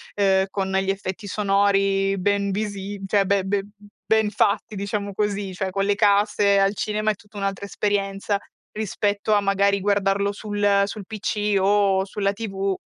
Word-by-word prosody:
uhm, 190 -1 +3
con 190 -1 -2
gli 190 0 0
effetti 195 +1 -4
sonori 195 -1 +2
ben 200 +1 0
visi 200 -1 -4
cioè 200 0 +2
be 200 0 +2
ben 200 +1 -2 0.4
ben 220 -1 +3
fatti, 210 +1 0
diciamo 200 0 -3
così. 200 -1 -2
Cioè, 190 +1 -3
con 195 +1 0
le 205 0 +2
casse 205 -1 +3
al 195 +1 +2
cinema 215 +1 0
è - - -4
tutta 205 +2 -23
un'altra 195 0 -3
esperienza 200 0 -1 0.3
rispetto 205 0 -1
a 205 - +4
magari 200 0 +2
guardarlo 200 0 +1
sul 205 -1 +1
sul 205 0 -7
PC 210 -1 -1
o 195 -1 +3
sulla 200 0 -1
TV, 195 -2 -2
200 Hz, 160 wpm, -23 LUFS, 195-205 Hz, 0.4 s, a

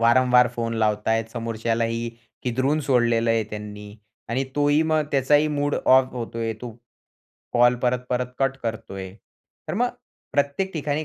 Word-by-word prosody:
वारंवार 125 +1 +5
फोन 115 -1 -2
लावत 105 -1 +1
आहेत, 115 0 +2
समोरच्यालाही 115 0 -1 0.3
किदरून 130 +5 +1
सोडलेलं 120 -4 +2
आहे 115 -1 +2
त्यांनी 105 -1 -8 0.3
आणि 130 +4 0
तोही 145 +1 +3
मग 155 -1 +3
त्याचाही 145 +3 +3
मूड 145 -1 0
ऑफ 130 0 +4
होतोय 115 -2 -3
तो 125 - -6 0.8
कॉल 120 0 +5
परत-परत 125 0 0
कट 135 0 +1
करतोय, 95 -4 -5 0.6
तर - - -2
मग 245 +4 +2 0.4
प्रत्येक 145 +7 0
ठिकाणी 150 -1 -2
125 Hz, 135 wpm, -24 LUFS, 115-140 Hz, 0.8 s, वारंवार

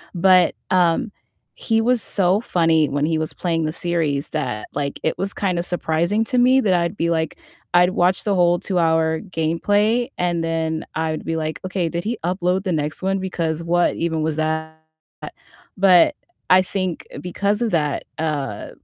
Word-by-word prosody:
But, 185 +1 +4 0.2
um, 180 +3 +2 0.4
he 225 -1 0
was 245 0 +2
so 195 +1 +2
funny 165 -7 +2
when 145 +1 0
he 160 0 0
was 155 - -3
playing 165 -3 -1
the 155 - -1
series 160 -5 -1
that, 125 -9 -3
like, 140 -1 -3
it 160 - -1
was 195 +1 -1
kinda 180 -4 -1
surprising 175 +4 0
to 250 - -1
me 255 +2 +5
that 200 -6 +2
I'd 175 +2 0
be 170 - 0
like 160 -1 -1 0.4
I'd 180 +1 +5
watch 185 0 +1
the 205 - +1
whole 175 -1 +3
two-hour 160 -3 +1
gameplay, 205 +7 0
and 175 -2 0
then 160 -1 -2
I 160 0 -1
would 155 - -5
be 165 0 -2
like, 155 0 -3
"Okay, 185 -2 -1
did 170 +1 -4
he 225 +2 -2
upload 180 +1 0
the 185 - 0
next 150 -1 -2
one, 195 +1 +1
because 170 -4 -3
what 175 +1 +1
even 160 -1 -1
was 155 -1 -1
that?" 160 0 -2 1.0
But, 190 - +5 0.4
I 185 0 +7
think, 185 -2 -4
because 200 +4 -1
of 230 - -1
that, 150 -4 0 0.2
uh, 150 -4 -3
170 Hz, 175 wpm, -21 LUFS, 160-190 Hz, 1.0 s, I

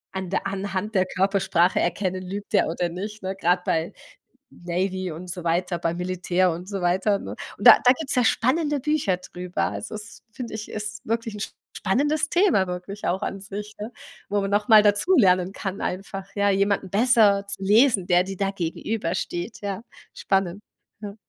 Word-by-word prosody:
an 190 -1 -4
der 195 - -1
anhand 200 +1 -3
der 185 -2 +3
Körpersprache 190 -2 +2
erkennen, 185 +1 -1
lügt 200 +3 -7
der - - +4
oder 170 +2 -1
nicht, 205 +5 -7
ne? 190 +1 -3
Grade 180 -1 +1
bei 160 +1 0 0.6
Navy 185 +1 -3
und 175 +3 -8
so 175 +1 -5
weiter. 175 +1 0
Beim 170 0 -1
Militär 180 0 0
und 175 +3 -7
so 200 -2 -4
weiter, 190 +3 +2
ne? - - -8 0.3
Und - - -5
da - - +11
da 250 - +7
gibt's 280 +1 -4
ja 250 - +3
spannende 290 +7 +2
Bücher 275 -9 0
drüber. 180 0 -4
Also, 215 - -6
das 215 +1 -10
finde 235 +1 -7
ich 215 -1 -6
ist 210 0 -6
wirklich 230 -1 -2
'n - - -7
sp - - -6 0.2
spannendes 290 +10 +1
Thema 345 - +3
wirklich 180 +3 -6
auch 190 +3 0
an 195 - -3
sich, 205 +2 -7
ne, 215 +4 -6 0.4
wo 205 0 +1
man 195 0 -2
noch 205 +1 +1
mal 215 -2 +8
dazulernen 205 - +3
kann 195 -1 -5
einfach, 195 +1 -4
ja, 200 0 +2
jemanden 195 -1 +1
besser 205 -2 +4
zu 200 -1 -6
lesen, 210 -1 +4
der 180 0 +4
dir 195 +1 -6
da 195 +1 0
gegenübersteht, 180 +1 -3
ja, 200 0 -4 0.3
spannend, 195 -1 -1 0.4
ja. 205 -2 -7
195 Hz, 185 wpm, -24 LUFS, 180-210 Hz, 0.6 s, da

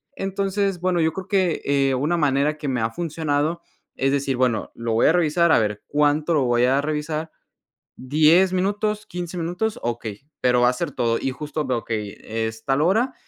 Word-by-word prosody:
Entonces, 195 -1 -1
bueno, 180 -1 0
yo 160 0 +2
creo 190 +1 -6
que, 185 -4 +1
eh, 140 -1 +2
una 150 +7 0
manera 145 0 +1
que 150 - -5
me 125 -2 -1
ha 110 - +1
funcionado 160 +1 -1 0.3
es 135 +1 +1
decir: 135 -2 0
"Bueno, 125 -4 0
lo 115 -1 -3
voy 115 - +4
a - - +6
revisar, 170 0 +3
a - - +5
ver 105 -1 -1
cuánto 150 +2 +1
lo 140 - +3
voy 120 0 +2
a 135 +2 +3
revisar, 155 +1 -3 0.7
10 155 +8 +4
minutos, 205 +3 -1
15 175 -1 -6
minutos, 180 +6 -2
okey. 115 -3 -4 0.2
Pero 125 -1 +3
va 125 - +5
a 125 - 0
ser 165 +2 -3
todo". 115 -3 0
Y 135 - -2
justo 150 +2 -4
veo 125 -3 -1
que 110 -2 -2
y 100 - -9
es 110 0 -4
tal 135 +1 +1
hora, 225 +10 +2
150 Hz, 200 wpm, -23 LUFS, 125-175 Hz, 0.7 s, a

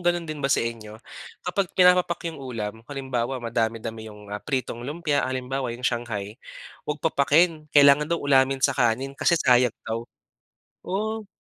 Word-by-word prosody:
gano'n 175 -1 +2
din 155 -2 -6
ba 135 - 0
sa - - +2
inyo. 110 -2 -6 0.5
Kapag 185 +1 -1
pinapapak 180 -2 +4
yung 160 -4 -8
ulam. 110 -5 -5
Halimbawa, 130 -2 -2
madami-dami 115 -1 -3
yung, 105 -1 -12
ah, 105 - -4
pritong 130 -4 -3
lumpia, 145 +3 -1
halimbawa 130 0 -2
yung 125 - -10
Shanghai, 115 -2 -3 0.5
huwag 150 +1 -4
papakin. 155 +1 +2
Kailangan 145 0 +6
daw 170 - +1
ulamin 135 -2 +2
sa 140 - +4
kanin 125 +2 0
kasi 165 +5 +2
sayang 125 -5 +3
daw. 115 +1 -4 0.8
Oo. 215 +3 -2
135 Hz, 155 wpm, -25 LUFS, 115-155 Hz, 0.8 s, Kailangan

